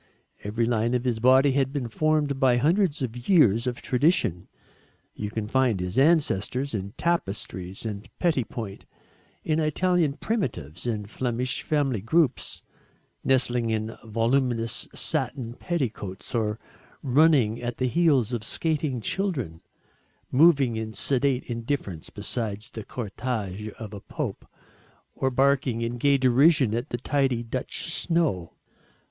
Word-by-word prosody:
Every 110 +3 0
line 115 +1 +1
of 125 - 0
his 120 -3 0
body 130 +3 +5
had 135 0 +1
been 140 -4 -3
formed 150 +2 0
by 130 -2 +4
hundreds 160 +2 +2
of 120 0 -6
years 120 - +5
of 125 -1 -3
tradition. 125 - +1 0.7
You 105 - -4
can 110 0 -4
find 125 -4 +2
his 90 +2 -4
ancestors 140 - +2
in 100 -1 -4
tapestries 95 - -2
and 105 +1 -5
petit 160 -8 +1
point 105 -5 -7 0.6
in 155 0 0
Italian 160 0 +1
primitives 125 - -3
and 105 -3 -2
Flemish 125 +2 -2
family 135 -8 0
groups, 150 - 0 0.6
nestling 125 -3 +2
in 110 0 -2
voluminous 115 +1 0
satin 120 -3 -2
petticoats, 120 - -4
or 110 -3 0 0.5
running 135 -5 +3
at 120 -1 -4
the 130 - 0
heels 135 -5 +2
of 115 -3 -2
skating 150 -1 -1
children 130 - -2 0.7
moving 140 -5 +4
in 110 -1 -5
sedate 135 +3 +1
indifference 115 - -4
beside 105 0 -3
the 110 - -6
cortège 105 -3 -4
of 110 -2 -9
a 100 - -7
pope, - - -5 0.7
or 130 - 0
barking 130 -2 +2
in 120 +1 -3
gay 140 +2 +4
derision 130 -1 +4
at 120 +2 -2
the 120 - -2
tidy 130 -2 0
Dutch 130 +7 -1
snow. 155 - +1
125 Hz, 130 wpm, -26 LUFS, 110-140 Hz, 0.7 s, body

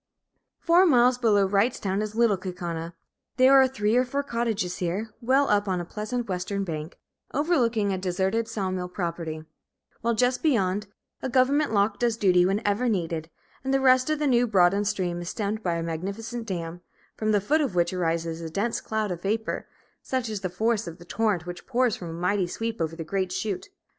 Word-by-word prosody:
Four 350 +2 +4
miles 250 -3 +4
below 205 -5 +3
Wrightstown 200 -1 +1
is 215 0 -4
Little 230 -3 +4
Kaukauna. 175 -3 -5 0.4
There 260 +1 +6
are 265 -1 +7
three 225 -4 0
or 250 - +5
four 280 +3 -2
cottages 230 -8 -2
here, 190 +5 -2
well 265 +4 +3
up 205 0 +2
on 185 -1 0
the 175 - -3
pleasant 220 +6 -4
western 195 +1 -2
bank, 160 -2 -5 0.4
overlooking 240 - +2
a 190 - -2
deserted 190 +5 0
saw 200 -5 -2
mill 180 -1 -3
property; 170 -3 -4 0.6
while 235 0 +1
just 250 +2 +2
beyond, 210 - +1 0.3
a 265 - -2
government 270 +3 +3
lock 205 0 +1
does 235 -2 +1
duty 180 -4 +4
whenever 205 +4 +1
needed, 165 -5 -2 0.3
and 265 - -1
the 270 - +3
rest 255 0 +4
of 310 - +1
the 300 - -1
now 245 -3 +3
broadened 200 0 +3
stream 175 -3 -1
is 175 - -5
stemmed 215 0 -2
by 175 -4 0
a 165 - -2
magnificent 200 +8 -4
dam, 175 -2 -4 0.3
from 215 0 0
the 205 - +4
foot 295 +11 +2
of 265 -11 -1
which 175 +1 +2
arises 165 -2 -1
a 165 - -5
dense 205 +8 -1
cloud 215 -2 -2
of 175 -1 -5
vapor, 220 +3 -2 0.3
such 255 -3 -2
is 210 -3 -4
the 185 - -2
force 220 +3 0
of 165 0 -7
the 175 - -14
torrent 205 -4 0
which 175 0 -8
pours 250 -5 +1
with 175 - -5
a - - -6
mighty 180 +2 0
sweep 225 +3 -4
over 165 0 -1
the 165 - -5
great 185 +2 -2
chute. 190 - -3
205 Hz, 200 wpm, -26 LUFS, 180-235 Hz, 0.6 s, are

